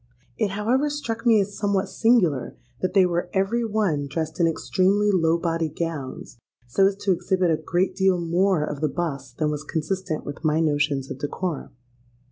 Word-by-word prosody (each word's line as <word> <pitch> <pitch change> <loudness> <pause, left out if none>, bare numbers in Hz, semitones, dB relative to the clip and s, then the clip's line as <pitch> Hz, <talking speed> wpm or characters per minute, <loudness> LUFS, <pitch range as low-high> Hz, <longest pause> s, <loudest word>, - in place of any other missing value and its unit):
It 215 - +1
however 235 +9 +1
struck 240 -5 -3
me 225 -2 +6
as 200 +1 -4
somewhat 200 -1 0
singular 185 - +2 0.2
that 185 +1 -1
they 190 -2 +6
were 175 0 -1
every 200 +5 +1
one 205 -10 0
dressed 160 +4 -3
in 170 - +4
extremely 195 +5 +2
low 165 -3 +3
bodied 165 -2 -2
gowns, 145 -7 -5 0.3
so 195 +11 +3
as 195 - -1
to 200 - +2
exhibit 185 0 +1
a - - +4
great 175 +4 0
deal 190 -2 +2
more 175 0 +2
of 150 -1 -5
the 155 - +1
bust 140 -5 -4
than 155 -1 +1
was 150 0 -4
consistent 160 +2 -3
with 145 +3 -7
my 155 0 +2
notions 145 -3 0
of 135 - -6
decorum. 150 +1 -4
175 Hz, 180 wpm, -24 LUFS, 155-195 Hz, 0.3 s, me